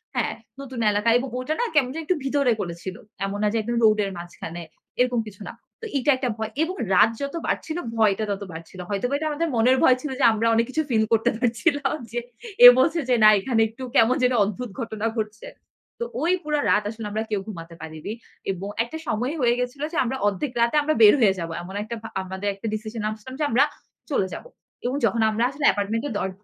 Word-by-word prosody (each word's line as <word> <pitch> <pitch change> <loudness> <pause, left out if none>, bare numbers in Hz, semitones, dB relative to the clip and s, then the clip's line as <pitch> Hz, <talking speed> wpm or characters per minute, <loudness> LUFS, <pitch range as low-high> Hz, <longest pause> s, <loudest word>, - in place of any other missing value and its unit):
হ্যাঁ, - - 0 0.3
নতুন 260 -3 -7
এলাকা 210 +2 +1
এবং 265 - -3
ওটা 295 +5 -2
না - - +2
কেমন 265 -4 +4
জানি 325 +1 -5
একটু 355 +1 +1
ভিতরে 275 -2 +2
করেছিল। 175 +1 -6 0.3
এমন 195 +1 -3
না - - +3
যে, - - +1
একদম 235 +2 -2
রোডের 215 -2 +4
মাঝখানে। 175 0 -8 0.4
এরকম 250 -1 +2
কিছু 205 -1 -12
না। - - -7 0.3
তো 455 - -6
এইটা 275 +2 +3
একটা 260 -1 -1
ভয়। 220 0 -4
এবং 360 +3 -3 0.2
রাত 200 +4 +6
যত 280 +3 -3
বাড়ছিল 315 +1 -2 0.2
ভয়টা 215 -1 +2
তত 200 0 -3
বাড়ছিল। 165 +3 -10
হয়তোবা 210 +6 -1
এটা 310 - -2
আমাদের 325 +3 -1
মনের 245 +3 +4
ভয় 255 - +6
ছিল 300 - -4
যে, - - +1
আমরা 225 +1 0
অনেক 230 +1 +3
কিছু 315 +4 0
ফিল 220 -3 +3
করতে 225 0 +3
পারছিলাম 270 +5 +1 0.2
যে, 240 - -1 0.5
এ - - +16
বলছে 330 +5 +3
যে, 250 - +5
না 215 - +10
এখানে 225 +2 +1
একটু 230 +4 -10
কেমন 230 +3 +5
যেন 250 - +3
অদ্ভুত 215 +5 -4
ঘটনা 220 -2 -4
ঘটছে। 215 0 -4 0.5
তো - - -1 0.2
ওই 340 +3 +2
পুরা 300 -1 0
রাত 210 - +3
আসলে 225 0 -7
আমরা 220 +2 -1
কেউ 205 - +1
ঘুমাতে 170 -5 -8
পারিনি। 160 +5 -6 0.4
এবং 190 +1 -5 0.2
একটা 240 +7 -7
সময় 245 +6 -1
হয়ে 240 -1 +4
গেছিল 250 +3 -3
যে, 330 - -4
আমরা 260 +2 -2
অর্ধেক 205 +7 -1
রাতে 235 +4 +2
আমরা 310 +1 +1
বের 210 - +9
হয়ে 195 -4 +4
যাবো। 165 -1 -4
এমন 185 +2 -9
একটা 235 +2 -5
ভা 225 - -8
আমাদের 190 +2 -5
একটা 200 +3 -6
ডিসিশন 215 +1 -4
নামছিলাম 215 +4 -5
যে, - - +1
আমরা 245 +4 +4 0.5
চলে 200 -9 +1
যাব। - - -7 0.4
এবং 250 +3 0
যখন 230 0 +1
আমরা 220 +2 0
আসলে 280 +2 -3
অ্যাপার্টমেন্ট 215 +5 +1
এর 280 - -4
দর 190 - -1
230 Hz, 220 wpm, -24 LUFS, 205-265 Hz, 0.5 s, এ